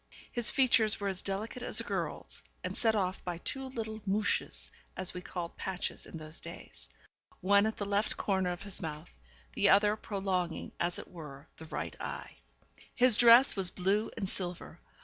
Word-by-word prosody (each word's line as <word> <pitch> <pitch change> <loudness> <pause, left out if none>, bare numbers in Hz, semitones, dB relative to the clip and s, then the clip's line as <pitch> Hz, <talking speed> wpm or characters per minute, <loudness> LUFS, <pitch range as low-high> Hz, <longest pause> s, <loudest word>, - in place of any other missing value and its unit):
His 240 -2 +4
features 240 -5 +3
were 200 -1 -1
as 185 -1 -2
delicate 210 +5 -3
as - - +2
a - - 0
girl's, - - -4 0.2
and - - -4
set 225 -2 +2
off 185 -2 -1
by 175 -2 -3
two 270 +9 -3
little 220 -4 -5
'mouches,' 205 +2 -1 0.3
as 185 - -2
we 180 - -6
called 175 -1 -6
patches 190 -1 -3
in - - -8
those 155 0 -4
days, 170 0 -10 0.5
one 200 +2 +4
at 220 - -3
the 205 - -3
left 205 +2 0
corner 190 -3 0
of 175 - -6
his 200 -2 -2
mouth, 155 -1 -6 0.4
the 200 - +3
other 210 +1 +5
prolonging, 190 -5 -2
as 175 0 +2
it - - -7
were, 150 -4 -10
the 160 - -10
right - - -4
eye. - - -6 0.6
His 250 -3 +6
dress 235 +3 +7
was 190 -3 +3
blue 195 +5 0
and 195 - -2
silver. 175 -3 -3
195 Hz, 180 wpm, -32 LUFS, 180-220 Hz, 0.6 s, dress